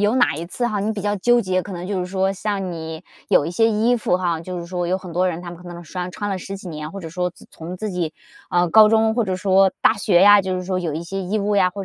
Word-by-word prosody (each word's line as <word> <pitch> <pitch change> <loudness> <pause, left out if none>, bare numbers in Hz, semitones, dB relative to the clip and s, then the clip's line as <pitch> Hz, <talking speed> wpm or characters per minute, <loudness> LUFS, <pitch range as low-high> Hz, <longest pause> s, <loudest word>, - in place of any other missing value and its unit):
有 205 +3 +2
哪 245 -2 +3
一 165 +3 -5
次 240 +6 -2
哈， 210 -4 -1
你 210 +2 -1
比 205 -3 -4
较 205 0 0
纠 240 +5 +3
结， 185 -4 0
可 200 - -9
能 180 -1 -6
就 195 -2 -2
是 180 - -3
说 190 +1 0
像 195 -2 -3
你 160 -1 -6 0.3
有 - - +4
一 165 - -3
些 225 +6 +3
衣 225 +3 +2
服 215 -6 +1
哈， 170 -3 -1
就 180 +1 -6
是 170 - -6
说 175 0 -3
有 185 +2 +1
很 185 -3 -9
多 185 +2 +2
人 175 0 -4
他 175 - -7
们 170 - -10
可 175 - -10
能 175 0 -9
穿- 180 +3 -5
穿 205 +2 -4
了 190 - -2
十 195 +2 -6
几 190 - -11
年， 155 0 -6
或 195 - -8
者 165 -4 -7
说 180 +1 -1
自 175 - -16
从 170 +3 -8
自 215 +2 -4
己， 175 -4 -3 0.3
啊， 175 0 +2
高 215 +3 +7
中 220 0 +3
或 235 - +2
者 190 -3 -2
说 190 0 +4
大 - - +6
学 205 -4 +2
呀， 205 0 +8
就 185 -1 -2
是 180 - -4
说 185 0 -1
有 165 -4 -3
一 160 - -4
些 195 +3 -5
衣 190 +3 -2
物 205 0 0
呀， 185 -2 +4
或 195 +1 -6
185 Hz, 335 characters per minute, -21 LUFS, 175-205 Hz, 0.3 s, 呀